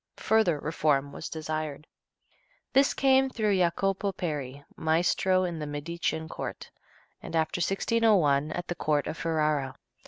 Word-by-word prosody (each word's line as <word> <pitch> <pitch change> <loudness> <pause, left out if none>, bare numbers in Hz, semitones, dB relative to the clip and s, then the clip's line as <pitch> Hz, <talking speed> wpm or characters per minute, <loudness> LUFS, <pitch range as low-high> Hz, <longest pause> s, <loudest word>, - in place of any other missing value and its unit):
Further 220 -8 +2
reform 145 -2 0
was - - -7
desired. 155 -2 -4 0.9
This 275 +1 +4
came 265 0 +4
through 215 -5 0
Jacopo 195 +3 +1
Peri, 145 -5 -4
maestro 180 +3 +2
at 170 -2 -4
the 150 - -4
Medician 160 +2 -3
court, - - -7 0.5
and - - -6
after 160 +2 0
1601 185 -7 +2
at 175 +2 -4
the - - -2
court 150 -4 0
of - - -4
Ferrara. 150 -4 0
160 Hz, 130 wpm, -28 LUFS, 150-190 Hz, 0.9 s, This